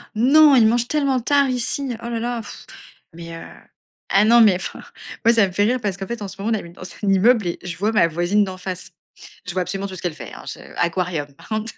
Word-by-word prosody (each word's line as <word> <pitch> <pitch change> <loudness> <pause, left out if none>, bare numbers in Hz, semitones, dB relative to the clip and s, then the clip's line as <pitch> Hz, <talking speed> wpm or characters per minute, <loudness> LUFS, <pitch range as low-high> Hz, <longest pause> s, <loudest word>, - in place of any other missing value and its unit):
Non! 280 +6 +6
Ils 235 -4 +6
mangent 240 +1 +1
tellement 280 -4 +1
tard 280 +2 +2
ici. 255 +2 -2
Oh 235 - -4
là, 230 -1 -2
là, 240 0 -3
pff! 210 - -11 0.5
Mais, 170 0 -9
heu, - - -9 0.7
ah 200 +2 +4
non, 235 +2 +6
mais, 215 -4 +6
enfin 185 - -6 0.4
moi, 230 - +6
ça 225 -3 +4
me 185 - -7
fait 205 +3 +1
rire 245 +4 +1
parce 200 -4 -2
qu'en 195 0 -6
fait, 235 0 -5
en 200 - -5
ce 195 +1 -11
moment, 220 +3 -1
on - - 0
habite 170 -3 -11
dans - - -14
un 185 +3 -6
immeuble 215 +2 +4
et 170 - -3
je 175 -2 -6
vois 210 +5 0
ma 210 -6 +4
voisine 175 +6 +1
d'en 190 -1 -6
face. 185 0 -7 0.6
Je 185 - -4
vois 185 +1 0
absolument 195 +2 -4
tout 190 - -8
ce - - -10
qu'elle 175 - -2
fait, 120 -8 -10
hein, - - -12
je - - -7 0.2
aquarium 170 -4 -1
par - - -17
contre. 220 +1 -3
205 Hz, 260 wpm, -21 LUFS, 180-235 Hz, 0.7 s, Non